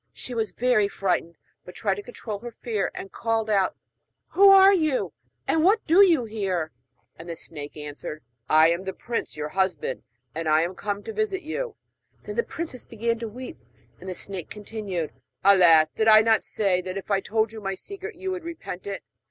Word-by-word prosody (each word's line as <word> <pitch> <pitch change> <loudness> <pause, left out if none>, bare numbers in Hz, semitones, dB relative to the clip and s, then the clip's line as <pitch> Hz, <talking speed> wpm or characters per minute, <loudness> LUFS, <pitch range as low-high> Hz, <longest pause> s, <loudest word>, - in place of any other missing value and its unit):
She 250 - -7
was 225 -2 -1
very 245 -4 +2
frightened, 180 -4 -1 0.3
but 180 - -12
tried 200 -3 0
to 200 - -5
control 215 -2 -6
her 240 - -7
fear, 225 -3 -2
and 195 - -7
called 225 -1 -1
out: 195 -3 +2 0.5
'Who 395 +1 +7
are 390 0 +8
you, 310 -7 +1 0.3
and 320 - +2
what 415 +5 +4
do 340 +5 +6
you 325 -10 +4
here?' 190 -7 -2 0.5
And 165 +1 -9
the 165 - -4
snake 150 -2 -8
answered: 150 +1 -7 0.3
'I 155 +1 +6
am 170 +2 -1
the 190 - -3
prince, 235 -4 -4
your 150 0 -3
husband, 195 - -1 0.3
and 165 -1 -2
I 155 +1 +5
am 175 +2 -3
come 205 +1 -4
to 445 - -6
visit 415 -4 -1
you.' 455 +9 -4 0.5
Then - - -6
the - - +3
princess 325 - -6
began 230 0 -2
to 230 - -4
weep; 250 +4 -8 0.4
and 190 - -8
the 185 - -4
snake 190 -3 -5
continued: 205 -6 -5 0.3
'Alas! 175 -5 +6
did 220 - 0
I 215 0 +9
not 225 -1 +3
say 195 -4 +1
that 185 +1 -5
if 195 - -6
I 195 - +3
told 220 +1 0
you 220 - -8
my 195 -1 -2
secret 400 - -8
you 380 0 -4
would 365 -2 -4
repent 320 - -7
it? 200 -1 -5
215 Hz, 200 wpm, -25 LUFS, 185-255 Hz, 0.5 s, I